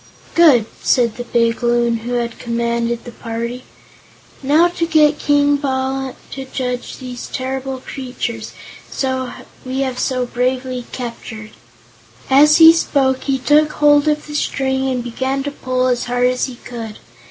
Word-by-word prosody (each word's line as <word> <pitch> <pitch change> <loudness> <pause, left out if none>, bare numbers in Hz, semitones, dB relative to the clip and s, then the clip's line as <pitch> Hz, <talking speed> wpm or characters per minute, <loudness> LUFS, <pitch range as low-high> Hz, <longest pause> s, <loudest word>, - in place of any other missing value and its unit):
"Good!" 295 -10 +6 0.2
said 235 -3 +2
the 245 - -5
big 230 -1 +1
Loon 240 -1 +2
who 235 +2 -5
had 235 -1 -2
commanded 235 0 -1
the 240 - -9
party. 235 +2 -5 0.8
"Now 300 +5 +4
to 345 -1 -2
get 305 -2 +4
King 290 0 +3
Bal 265 -1 -2 0.2
to 270 -1 -6
judge 250 -2 -4
these 250 -1 -7
terrible 265 0 -4
creatures 250 -4 -5 1.1
we 260 +1 -3
have 260 -2 -2
so 255 -2 0
bravely 250 0 -2
captured." 230 -3 -7 0.8
As 300 +3 +7
he 325 0 +9
spoke 270 -5 +1
he 275 -1 +1
took 300 +3 +3
hold 290 0 +4
of 300 0 +1
the 300 - -9
string 265 -2 -1
and 250 -2 -2
began 260 +3 -2
to 285 - -3
pull 255 -2 -1
as 250 -1 0
hard 245 0 0
as 250 0 0
he 255 - -7
could. 230 -3 -8
255 Hz, 150 wpm, -18 LUFS, 240-275 Hz, 1.1 s, he